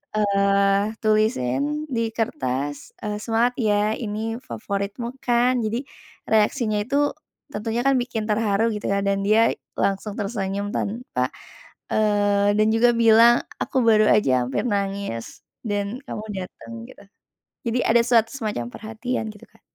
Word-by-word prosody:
eee, 200 0 +2
tulisin 215 - +1
di 230 -2 0
kertas, 145 - -3
eee, 210 0 -2
"Semangat 235 +2 +1
ya, 210 -2 +2
ini 225 0 -3
favoritmu 205 0 -4
kan." 245 +1 +2
Jadi 230 +5 -2 0.5
reaksinya 215 0 +2
itu, 280 +6 +1 0.4
tentunya 225 +3 -2
kan 275 0 +4
bikin 235 -3 -3
terharu 215 +1 +1
gitu 210 - -4
ya, 200 - +2
dan 200 0 +1
dia 220 +2 +4 0.3
langsung 200 +1 -1
tersenyum, 200 -1 -2
tanpa, 205 - -2 0.6
eee, 205 -1 +2
dan 215 0 +4
juga 240 +2 +4
bilang, 230 +1 +6 0.2
"Aku 260 -2 0
baru 215 -2 +5
aja 130 -12 +3
hampir 130 - -1
nangis, 200 - -3 0.2
dan 205 +2 -2
kamu 210 - -5
dateng." 180 -11 -8 0.2
Gitu. - - -15 0.6
Jadi 235 +1 0
ada 235 +1 +5
suatu 230 -2 +3
semacam 215 - -3
perhatian 225 +2 -4
gitu, 210 - -16
Kak. - - -26
215 Hz, 135 wpm, -23 LUFS, 200-230 Hz, 0.6 s, bilang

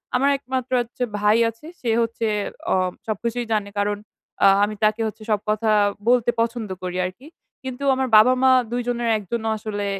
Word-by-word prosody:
আমার 275 +3 +3
১ 275 - -27
মাত্র 260 0 -2
হচ্ছে 240 +1 -5 0.2
ভাই 210 +2 +4
আছে 230 +6 -13 0.2
সে 240 - -2
হচ্ছে 230 0 -1 0.5
অ - - +3 0.3
সবকিছুই 235 +3 -2
জানে। 205 -1 -1
কারণ, 205 0 0 0.5
আ - - +9 0.2
আমি 210 +1 -1
তাকে 215 +2 +2
হচ্ছে 215 0 -8
সব 210 - +2
কথা 215 +1 +1 0.4
বলতে 245 -1 +3
পছন্দ 230 -2 -2
করি 180 0 -3
আরকি। 215 +11 -8 0.4
কিন্তু 260 +1 -6
আমার 260 0 -1
বাবা-মা 255 +3 +5 0.2
২ 245 0 -1
জনের 240 -1 -1
১ 210 - -8
জনও 225 -1 -1
আসলে 205 -1 -4
230 Hz, 180 wpm, -22 LUFS, 210-245 Hz, 0.5 s, আ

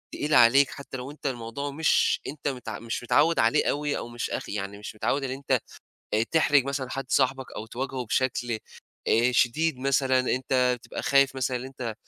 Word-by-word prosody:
تقيل 150 +1 -2
عليك 130 +3 +6
حتّى 140 -2 -8
لو 130 +3 -7
أنت 150 - -16
الموضوع 130 +3 -4
مش 160 +3 +2
أنت 145 0 -5
مت 125 -4 -4
مش 115 +1 -5
متعوّد 165 +7 +3
عليه 115 - +3
أوي 145 0 -1
أو - - -5
مش 120 0 -4
أخ - - -4
يعني 100 0 -4
مش 105 +1 -8
متعوّد 135 +6 -1
اللي 130 0 -2
أنت 135 -2 0 0.6
آآ 110 - +3
تحرج 145 -4 +4
مثلًا 140 -2 -3
حد 135 - -3
صاحبك 135 -1 +1
أو 110 - -6
تواجهه 130 +2 -4
بشكل 120 -1 0 0.5
آآ 120 +3 +3
شديد 130 +5 +2
مثلًا 135 -1 +2
أنت 130 0 +1
بتبقى 120 - -7
خايف 140 -1 +3
مثلًا 130 -1 -1
اللي 125 +2 -6
أنت 125 -4 -5
130 Hz, 190 wpm, -26 LUFS, 120-140 Hz, 0.6 s, عليك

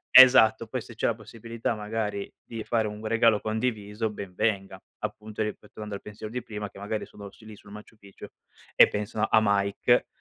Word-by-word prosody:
esatto, 115 -3 +8
poi 130 +1 -3
se 115 - -12
c'è - - -1
la 115 - +2
possibilità 115 +1 -5
magari 105 -1 -3
di 115 -2 -7
fare 110 -2 0
un 105 +1 -8
regalo 115 -1 +3
condiviso 110 -1 -2
ben 100 -3 -8
venga, 100 -3 -1 0.2
appunto 110 0 -4
ripe 105 - -5
tornando 105 -1 -7
al - - -9
pensiero 105 +1 -8
di 125 -1 -3
prima 105 -3 -6
che - - -15
magari 105 +2 -3
sono 100 -1 -11
sul 110 - -18
lì 105 - -10
sul 100 - -17
Maciu 105 +1 -12
Picchu 100 -1 -14 0.5
e - - +8
pensano 105 +1 -2
a - - +6
Mike 100 +4 +2
110 Hz, 195 wpm, -27 LUFS, 105-115 Hz, 0.5 s, esatto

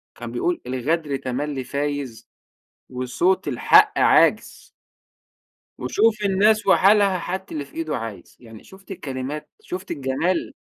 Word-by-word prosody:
كان - - -8
بيقول 355 -2 -1
الغدر 145 +4 -1
تملّي 135 +1 -4
فايز 140 -3 -4 0.6
وصوت 130 +10 0
الحق - - +4
عاجز. - - +2 1.1
وشوف 215 -1 +1
الناس 205 +2 +3
وحالها، 195 0 +4
حتى 190 +2 -5
اللي 145 -2 -4
في 140 - -21
إيده 160 -2 -3
عايز. 110 -6 -8
يعني 115 -3 -14
شُفت 195 +1 -15
الكلمات، 140 -3 -6
شُفت 185 +2 -7
الجمال، 145 +6 -1
155 Hz, 120 wpm, -22 LUFS, 130-190 Hz, 1.1 s, الحق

